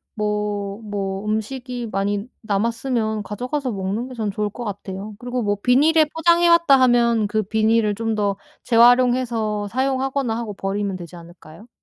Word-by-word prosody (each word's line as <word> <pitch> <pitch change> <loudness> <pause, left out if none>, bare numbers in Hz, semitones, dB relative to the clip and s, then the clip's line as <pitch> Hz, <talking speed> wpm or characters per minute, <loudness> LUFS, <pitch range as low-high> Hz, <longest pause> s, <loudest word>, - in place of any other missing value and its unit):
뭐. 210 -1 -2
뭐 200 -1 -4
음식이 240 +3 -3
많이 200 +1 -1 0.2
남았으면 220 +1 -1
가져가서 250 +4 -3
먹는 200 +6 -3
게 255 - -9
전 220 -4 -2
좋을 210 +1 -2
것 240 +4 -8
같아요. 200 0 -6
그리고 245 0 -3
뭐 205 -1 0
비닐에 305 +7 +4
포장해 340 +1 +3
왔다 335 -5 +5
하면 235 -3 +3
그 215 +1 0
비닐을 220 +1 +1
좀 225 +1 -2
더 205 -2 0 0.3
재활용해서 235 -3 +3
사용하거나 265 -1 -1
하고 225 -4 -5
버리면 195 0 -3
되지 175 -1 -10
않을까요? 170 +4 -14
220 Hz, 335 characters per minute, -21 LUFS, 205-250 Hz, 0.3 s, 왔다